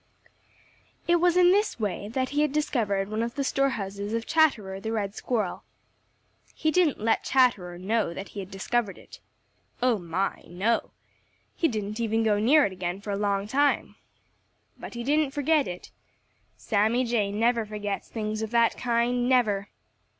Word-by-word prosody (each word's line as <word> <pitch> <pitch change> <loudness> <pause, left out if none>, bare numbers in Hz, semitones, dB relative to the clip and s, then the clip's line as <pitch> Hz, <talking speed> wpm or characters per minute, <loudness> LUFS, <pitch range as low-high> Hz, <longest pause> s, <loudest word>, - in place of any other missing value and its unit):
It 345 0 +4
was 350 +1 +3
in 360 0 +6
this 415 - +1
way 205 -1 -2
that 260 +4 -2
he 290 +2 0
had 300 -2 +2
discovered 220 -10 0
one 215 +2 -2
of 235 0 -3
the 280 - -1
store 275 0 +1
houses 200 -2 -4
of 230 0 -2
Chatterer 235 -13 +2
the 220 +3 -4
Red 205 -3 -2
Squirrel. 215 -5 -2 0.9
He 315 - 0
didn't 345 -4 +2
let 225 +1 +1
Chatterer 210 -10 +2
know 205 +1 0
that 190 +3 -7
he 205 - -8
had 190 -1 -6
discovered 200 +1 -2
it. - - -14 0.6
Oh, 245 -3 +2
my, 180 +3 -2
no! 210 +6 0 0.7
He 330 - +2
didn't 215 -3 -4
even 225 -1 +1
go 210 -2 +2
near 280 +7 +5
it 200 - -2
again 180 0 -4
for 205 0 -6
a - - 0
long 200 -1 0
time. 285 +5 +1 0.8
But - - -9
he 235 - -4
didn't 290 +1 +1
forget 295 0 +2
it. 180 0 -8 0.7
Sammy 220 +4 +1
Jay 220 -4 0
never 230 +2 +1
forgets 210 -1 -5
things 215 -1 -3
of 220 - -3
that 235 0 +3
kind, 245 +1 +1
never! 210 -6 +2
225 Hz, 170 wpm, -26 LUFS, 200-260 Hz, 0.9 s, in